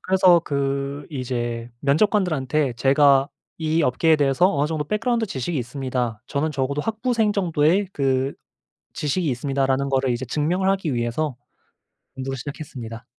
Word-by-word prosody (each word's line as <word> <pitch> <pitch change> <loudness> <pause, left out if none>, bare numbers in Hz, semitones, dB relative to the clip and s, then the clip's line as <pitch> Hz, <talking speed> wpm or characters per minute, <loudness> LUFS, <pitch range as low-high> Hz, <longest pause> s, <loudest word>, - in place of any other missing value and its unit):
그래서 185 -2 +5
그 140 0 -2
이제 120 -4 -3
면접관들한테 155 - +1
"제가 135 +3 +4 0.3
이 160 0 +1
업계에 155 +4 +3
대해서 145 +6 +3
어느 145 0 +1
정도 155 -1 -2
백그라운드 225 - 0
지식이 150 - -3
있습니다. 125 -3 -3
저는 150 +2 -1
적어도 140 0 -1
학부생 225 +2 0
정도의 180 0 +2
그 135 -2 0 0.6
지식이 155 +3 -1
있습니다."라는 135 +1 0
거를 135 -1 +1
이제 120 +1 -1
증명을 170 +9 0
하기 190 -8 -1
위해서 120 +4 -1 0.8
공부를 135 0 -4
시작했습니다. 125 -4 -7
140 Hz, 360 characters per minute, -23 LUFS, 130-165 Hz, 0.8 s, 그래서